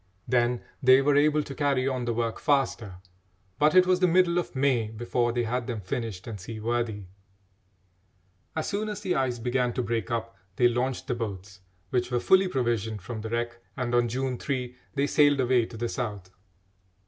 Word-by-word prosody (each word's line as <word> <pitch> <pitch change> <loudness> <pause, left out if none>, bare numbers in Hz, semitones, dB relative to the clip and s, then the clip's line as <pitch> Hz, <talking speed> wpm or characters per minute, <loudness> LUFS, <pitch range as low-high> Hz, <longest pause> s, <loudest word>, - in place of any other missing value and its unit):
Then 120 -1 +1 0.2
they 130 0 +7
were 145 0 +3
able 150 +1 +3
to 140 - -8
carry 140 -3 +1
on 130 -2 -1
the 120 - 0
work 115 -1 -1
faster; 125 -8 0 0.6
but 150 +2 +4
it 185 0 +7
was 185 0 +3
the 180 - +4
middle 175 0 +3
of 170 - -5
May 130 -4 +2
before 120 +2 -1
they 120 0 0
had 120 +1 -2
them 115 -3 -3
finished 100 -1 -4
and 110 -3 -6
seaworthy. 110 0 -3 1.5
As 160 - -2
soon 210 +1 -2
as 210 0 -5
the 190 -3 0
ice 130 -3 0
began 125 +1 0
to 125 - -1
break 115 -4 -2
up, 115 0 -3 0.2
they 120 - +5
launched 125 +2 -1
the - - -1
boats, 100 -4 -6 0.3
which 125 -1 0
were 125 -1 +1
fully 190 +8 +4
provisioned 115 - -1
from 110 +1 -6
the 110 - -5
wreck, 120 +1 -2 0.2
and 125 -2 -2
on 120 -1 +3
June 130 +1 -2
3 125 -3 -3 0.2
they 140 0 +2
sailed 145 -1 +4
away 125 -2 +3
to 115 - -10
the 120 +2 -2
South. 105 -7 -4
120 Hz, 190 wpm, -27 LUFS, 115-135 Hz, 1.5 s, they